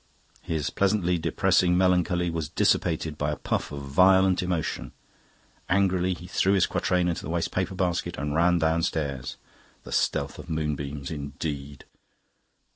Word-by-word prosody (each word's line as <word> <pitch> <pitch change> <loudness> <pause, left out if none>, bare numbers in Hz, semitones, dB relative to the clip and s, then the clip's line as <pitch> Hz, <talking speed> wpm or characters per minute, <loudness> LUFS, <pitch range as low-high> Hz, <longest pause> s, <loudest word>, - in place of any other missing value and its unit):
His 80 -4 -2
pleasantly 95 -3 +1
depressing 90 +2 +2
melancholy 90 -1 +2
was 80 -3 -3
dissipated 80 -2 0
by 75 - 0
a 75 - -1
puff - - -3
of 70 -1 -6
violent 95 +6 +4
emotion; 90 -3 -3 0.8
angrily 95 -1 +2
he 85 +1 -11
threw 95 +2 +1
his 95 - +4
quatrain 90 -1 0
into 85 - -1
the - - -7
waste 85 0 -1
paper 95 0 -2
basket 90 -2 -1
and 75 +1 -3
ran 85 +2 +3
downstairs. 80 -5 -1 0.5
"The - - -11
stealth - - 0
of - - -10
moonbeams," 75 -2 -3
indeed! 70 -1 -5
85 Hz, 140 wpm, -26 LUFS, 75-90 Hz, 0.8 s, violent